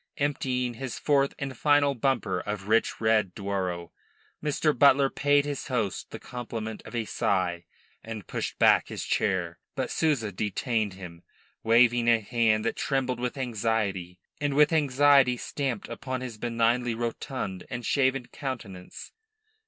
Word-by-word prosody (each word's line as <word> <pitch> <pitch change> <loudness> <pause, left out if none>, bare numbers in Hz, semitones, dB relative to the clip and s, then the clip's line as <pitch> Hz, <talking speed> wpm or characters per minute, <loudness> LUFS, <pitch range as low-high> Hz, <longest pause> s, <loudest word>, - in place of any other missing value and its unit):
Emptying 130 -3 -1
his 125 +1 -6
fourth 140 0 +2
and 135 -2 -5
final 145 +2 +3
bumper 120 -7 0
of 105 +1 -5
rich 115 +2 +2
red 110 -4 +2
Douro, 95 -4 -3 0.5
Mr. 150 0 +1
Butler 140 +1 +5
paid 145 0 +3
his 145 -2 -4
host 110 -7 -2
the - - -7
compliment 115 -3 -6
of - - -9
a 115 -2 -1
sigh 90 -4 -1 0.4
and 110 -4 -7
pushed - - -4
back - - +5
his - - -5
chair. 90 -5 -1 0.2
But - - -2
Souza 135 -10 +1
detained 105 +2 -1
him, 90 -3 -10 0.4
waving 120 +1 +4
a 115 -1 +5
hand 110 -1 +1
that 115 - -1
trembled 130 -3 -1
with 125 +3 -3
anxiety, 110 -7 -1 0.2
and 145 -1 -1
with 150 +2 +5
anxiety 140 -3 +4
stamped 130 -4 -3
upon 130 +2 -5
his 120 -4 -7
benignly 120 0 +1
rotund 115 -4 -4
and 120 -1 -5
shaven 135 -2 +1
countenance. 110 -10 -7
120 Hz, 145 wpm, -27 LUFS, 105-135 Hz, 0.5 s, Butler